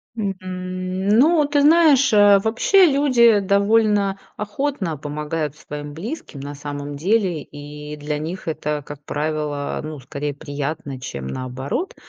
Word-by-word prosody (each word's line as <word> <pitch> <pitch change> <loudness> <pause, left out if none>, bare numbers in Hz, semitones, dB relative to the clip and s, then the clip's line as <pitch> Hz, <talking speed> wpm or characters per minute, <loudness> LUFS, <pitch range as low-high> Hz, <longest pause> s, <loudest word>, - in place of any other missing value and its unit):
М, 200 -4 -2
м, 185 +1 -4
ну, 300 +8 +5
ты 290 0 +2
знаешь, 290 -5 +5
э, 205 -1 +7
вообще 355 - +4
люди 255 -7 +4
довольно 200 0 +2 0.2
охотно 210 - -2
помогают 150 +1 -4
своим 145 -1 -7
близким, 205 - -7
на 140 +1 -6
самом 145 0 -6
деле. 185 -2 +1
И 150 +1 -9
для 150 0 -3
них 170 +3 -6
это, 150 -2 -2
как 145 0 -10
правило, 150 -1 -2
ну, 155 -2 -6
скорее 140 +2 -5
приятно, 145 -2 -5
чем 70 - -6
наоборот. 130 - -4
165 Hz, 135 wpm, -21 LUFS, 145-215 Hz, 0.2 s, э